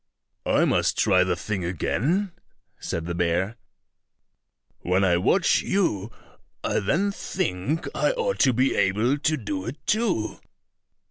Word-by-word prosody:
"I - - +3
must - - +1
try 95 -4 +4
the 90 -1 0
thing 100 +1 -4
again," 145 - 0 0.5
said 85 -1 -4
the 85 - -3
bear; 90 +5 0 1.2
"when 90 +2 +1
I 90 -2 +3
watch 175 - +3
you, 120 - 0 0.5
I - - 0
then 170 - +1
think 155 - -2
I - - +1
ought - - -1
to 130 - +5
be 130 +3 +2
able 110 +9 +1
to 155 +2 +1
do 100 -5 -4
it 130 +6 -5
too." 210 - 0
110 Hz, 135 wpm, -25 LUFS, -, 1.2 s, to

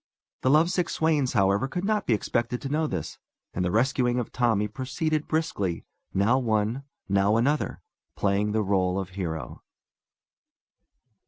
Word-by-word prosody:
The 130 - +2
lovesick 170 +4 +3
swains, 150 -5 +1
however, 100 +3 +2
could 180 +7 -3
not 215 0 0
be 115 - +4
expected 120 +3 -1
to 135 - -3
know 155 +2 +1
of - - -3
this, - - -5 0.3
and 90 - -1
the 90 - +1
rescuing 120 +3 +2
of 125 - -2
Tommy 115 -4 +1
proceeded 145 - -2
briskly, 105 - -1 0.3
now 105 +7 +3
one, 115 +2 0 0.2
now 100 +2 +3
another, 145 +6 0 0.3
playing 100 +1 +1
the 110 0 +1
r├┤le 95 -1 +1
of 95 -2 -4
hero. 85 -4 -5
120 Hz, 150 wpm, -26 LUFS, 100-145 Hz, 0.3 s, be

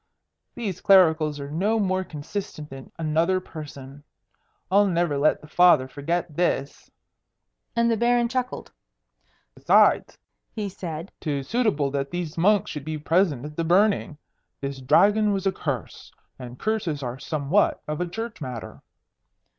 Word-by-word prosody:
These 205 -7 -4
clericals 160 -6 +4
are 140 0 -7
no 200 +8 +1
more 190 -2 0
consistent 150 -1 -7
than 135 -1 -10
another 165 +3 +1
person. 145 -5 -10 0.7
I'll 200 +1 +5
never 170 -4 +1
let 145 +2 +2
the 150 - -13
Father 175 -5 +5
forget 150 +4 -3
this." 170 -4 -1 0.9
And 235 0 +3
the - - +3
Baron 240 +1 +2
chuckled. 255 +1 -3 0.8
"Besides," - - +3 0.4
he 210 -2 -3
said, 170 -1 -7
"'tis 140 -5 -3
suitable 205 - +1
that 140 0 -2
these 175 -3 -4
monks 205 +4 +2
should 150 - -6
be 155 +1 -4
present 155 -3 +1
at 150 0 -8
the 165 - 0
burning. 180 -2 +2 0.4
This 140 -1 -5
Dragon 205 +9 +4
was 195 0 -2
a 195 - +3
curse, 140 - -5 0.3
and 125 -1 -9
curses 175 -9 -2
are 125 +1 -5
somewhat 155 +8 0
of 150 +2 -3
a 180 - -1
church 220 -2 -6
matter." 125 -5 -7
165 Hz, 145 wpm, -24 LUFS, 145-195 Hz, 0.9 s, I'll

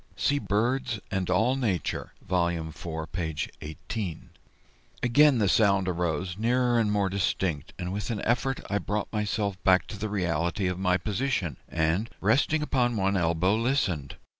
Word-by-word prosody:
[See 145 0 +2
BIRDS 120 +1 0
AND 95 -2 -1
ALL 95 +8 +3
NATURE, 105 - -2
Vol. 90 -2 +2
IV, 80 -1 -5
p. 80 -3 -3 0.3
18.] 85 +3 -5 0.7
Again 140 +3 +5
the 105 -3 +2
sound 100 -1 +3
arose, 90 +1 -2
nearer 120 +1 +2
and 105 -2 +2
more 100 -2 +2
distinct, 90 -5 -1
and 90 0 -4
with 100 +2 -3
an 110 -3 -2
effort 130 +3 0
I 100 - 0
brought 105 +1 -3
myself 105 -2 -1
back 95 -1 +4
to 105 - -7
the 110 0 -2
reality 90 0 0
of 90 0 -1
my 90 -1 +2
position, 100 - -1
and, 80 +8 0
resting 140 +9 +2
upon 125 -5 +1
one 100 0 +1
elbow, 85 +2 +2
listened. 110 - 0
100 Hz, 155 wpm, -27 LUFS, 90-115 Hz, 0.7 s, Again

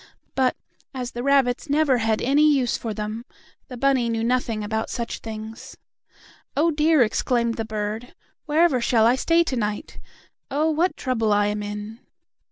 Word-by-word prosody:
But, 260 -1 +2 0.4
as 250 -2 -4
the 240 - -5
rabbits 275 +1 +2
never 285 -3 +3
had 220 -1 0
any 295 +4 +4
use 260 -4 +1
for 225 - -4
them, 215 +2 -4 0.4
the 250 - -8
bunny 260 -2 +2
knew 225 -1 -1
nothing 235 -3 0
about 220 +1 -2
such 235 -2 -4
things. 220 0 -8 0.8
"Oh, 325 +3 +3
dear!" 305 -2 +4
exclaimed 235 +1 0
the 225 -1 -4
bird. 215 +2 -4 0.3
"Wherever 300 -4 +3
shall 230 -1 +3
I 235 - +5
stay 330 +5 +3
to 275 - -3
night? 210 -3 -3 0.5
Oh, 305 +3 +1
what 335 +4 0
trouble 230 -5 0
I 205 0 +3
am 210 0 -1
in." 210 +2 -6
240 Hz, 165 wpm, -23 LUFS, 220-275 Hz, 0.8 s, I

